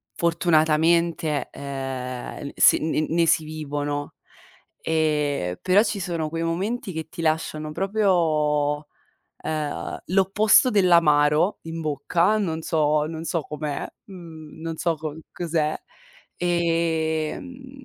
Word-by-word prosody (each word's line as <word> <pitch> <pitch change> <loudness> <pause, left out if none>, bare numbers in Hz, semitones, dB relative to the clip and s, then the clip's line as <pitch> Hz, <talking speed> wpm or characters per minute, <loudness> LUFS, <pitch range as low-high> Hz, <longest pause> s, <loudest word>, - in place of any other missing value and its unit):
fortunatamente, 165 -1 +2
eh, 135 -1 -6
s - - +7
n 155 0 0
ne 170 +1 +2
si 165 0 +3
vivono, 145 -2 -4 0.7
e 150 - 0
però 190 +4 +4
ci 210 -2 -2
sono 165 -4 -2
quei 165 +1 -3
momenti, 195 +7 -2
che 160 -1 -5
ti 165 - -7
lasciano 155 -1 -1
proprio, 155 -7 +1 0.5
ehm, 155 -2 -3
l'opposto 195 +6 +4
dell'amaro, 170 -3 +4
in 165 0 -6
bocca, 165 +7 +1
non 165 -6 -2
so 150 -2 +1
non 160 0 -6
so 165 -2 -1
com'è, 150 -1 -4 0.2
mhmm, 165 -5 -11
non 165 0 -4
so 170 -2 0
co 155 -1 -6 0.2
cos'è, 160 -3 -1 0.6
ehm, 170 - -1
160 Hz, 110 wpm, -24 LUFS, 150-175 Hz, 0.7 s, s